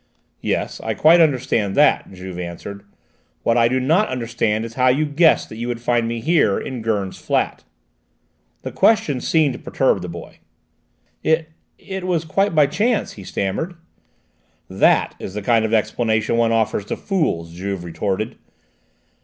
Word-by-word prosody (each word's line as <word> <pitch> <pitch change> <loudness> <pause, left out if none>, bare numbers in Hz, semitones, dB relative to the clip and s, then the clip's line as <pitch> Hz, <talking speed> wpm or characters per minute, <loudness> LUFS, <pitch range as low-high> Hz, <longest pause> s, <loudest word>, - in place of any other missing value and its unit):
"Yes, - - -2
I 110 -1 -2
quite 165 +7 +6
understand 125 -9 +1
that," 150 -7 +3
Juve 90 -1 -8
answered. 90 +3 -7 0.6
"What 115 - +2
I 115 -1 +4
do 130 +2 0
not 160 +11 +2
understand 115 -3 -1
is 115 - -8
how 130 +1 +2
you 135 +5 +3
guessed 155 +3 +3
that 110 - -9
you 120 +1 -4
would 120 -1 -3
find 120 -1 +1
me 115 0 -3
here, 155 - +2
in 130 -3 -5
Gurn's 105 -4 -2
flat." - - -1 1.0
The - - -5
question 205 - +2
seemed 155 -5 +2
to - - -8
perturb 130 -8 0
the 90 - -6
boy. 85 0 -10 0.8
"It 160 0 +1 0.3
it 190 -1 -7
was 170 -3 0
quite 195 +3 0
by 150 -1 +6
chance," 215 - 0
he 100 - -11
stammered. 100 - -3 0.9
"That - - +2
is 95 - -7
the 105 - -4
kind 115 0 +3
of 110 - -2
explanation 110 0 +1
one 115 -1 +2
offers 110 -3 0
to - - -4
fools," 120 - -1
Juve 95 +1 -4
retorted. 95 +5 -3
115 Hz, 160 wpm, -20 LUFS, 105-155 Hz, 1.0 s, quite